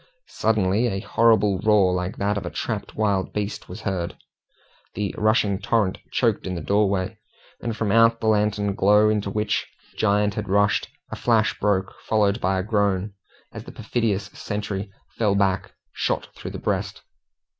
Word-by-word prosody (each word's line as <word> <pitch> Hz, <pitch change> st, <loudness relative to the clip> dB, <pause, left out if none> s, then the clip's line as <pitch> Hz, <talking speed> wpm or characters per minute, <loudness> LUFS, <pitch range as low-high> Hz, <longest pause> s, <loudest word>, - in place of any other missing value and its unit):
Suddenly 110 Hz, +1 st, +1 dB
a 95 Hz, -4 st, -2 dB
horrible 110 Hz, -4 st, +3 dB
roar 100 Hz, -3 st, +4 dB
like 90 Hz, +2 st, -3 dB
that 100 Hz, +1 st, 0 dB
of 100 Hz, -, -3 dB
a -, -, -4 dB
trapped 105 Hz, -3 st, -4 dB
wild 100 Hz, -3 st, 0 dB
beast 105 Hz, 0 st, -4 dB
was 110 Hz, -, -8 dB
heard. 95 Hz, -5 st, -3 dB, 0.8 s
The 100 Hz, -2 st, -2 dB
rushing 105 Hz, -2 st, +2 dB
torrent 105 Hz, -4 st, 0 dB
choked 115 Hz, -6 st, +1 dB
in 90 Hz, -, -3 dB
the 85 Hz, -, -4 dB
doorway, 100 Hz, 0 st, 0 dB, 0.4 s
and 115 Hz, -2 st, -3 dB
from 105 Hz, -3 st, 0 dB
out 115 Hz, +1 st, +5 dB
the -, -, -5 dB
lantern 105 Hz, -1 st, +2 dB
glow 105 Hz, +2 st, +4 dB
into 105 Hz, -2 st, 0 dB
which 105 Hz, +1 st, -1 dB, 0.2 s
the -, -, -27 dB
giant 105 Hz, -1 st, +2 dB
had 105 Hz, -, -4 dB
rushed, 100 Hz, +1 st, +2 dB, 0.2 s
a -, -, -3 dB
flash -, -, +1 dB
broke, 95 Hz, -2 st, 0 dB
followed 105 Hz, 0 st, +1 dB
by 95 Hz, +1 st, +1 dB
a 95 Hz, -, -1 dB
groan, 100 Hz, -1 st, 0 dB, 0.4 s
as -, -, -9 dB
the -, -, -9 dB
perfidious 105 Hz, -5 st, -2 dB
sentry 105 Hz, -1 st, -4 dB, 0.3 s
fell 105 Hz, -3 st, +2 dB
back 95 Hz, -1 st, +1 dB, 0.2 s
shot -, -, -1 dB
through -, -, -7 dB
the -, -, -6 dB
breast. -, -, -3 dB
105 Hz, 165 wpm, -23 LUFS, 95-110 Hz, 0.8 s, out